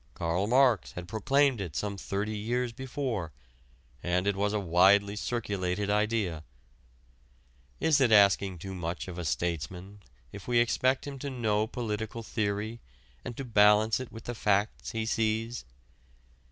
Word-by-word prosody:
Karl 85 +4 -1
Marx 125 - +3
had 90 0 -7
proclaimed 130 +3 +2
it 85 -7 -6
some 100 +6 -2
thirty 100 +2 -3
years 120 +3 -1
before, 125 - -4 0.7
and 90 +1 0
it 100 -1 +1
was 100 +1 0
a 105 - 0
widely 100 +3 +4
circulated 100 -3 -2
idea. 105 -6 0 1.4
Is 155 -3 +3
it 125 -4 +4
asking 100 -3 +5
too 95 +3 -7
much 85 -1 -4
of 90 -1 -7
a - - -3
statesman 90 +5 -3 0.3
if 100 - -10
we 120 -1 +2
expect 130 +2 +2
him 140 -2 -7
to 140 - -4
know 110 -4 0
political 110 -1 -4
theory 110 +1 -2 0.4
and 120 - -7
to 135 - -4
balance 105 0 +4
it 130 - -7
with 115 - -10
the 120 - -4
facts 105 -1 0
he 110 -1 -3
sees? 115 - -1
105 Hz, 150 wpm, -29 LUFS, 95-115 Hz, 1.4 s, asking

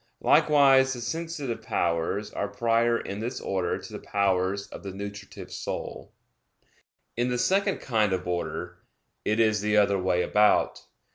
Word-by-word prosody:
Likewise 135 -3 +5
the 125 - -6
sensitive 155 -1 -4
powers 85 +5 -1
are 100 - -2
prior 115 +3 +1
in 100 - -6
this 120 +4 -4
order 95 -3 -1
to - - -11
the - - -5
powers 100 0 0
of - - -9
the 100 - -6
nutritive 100 +1 -8
soul. - - -6 1.0
In 120 +1 0
the 125 - 0
second 195 +9 +1
kind 110 -5 +1
of 90 -1 -2
order, 90 -1 -4 0.4
it 110 +2 0
is 110 -2 +3
the 105 0 +1
other 100 -1 +3
way 90 -1 +1
about. 105 0 +3
105 Hz, 150 wpm, -27 LUFS, 95-125 Hz, 1.0 s, Likewise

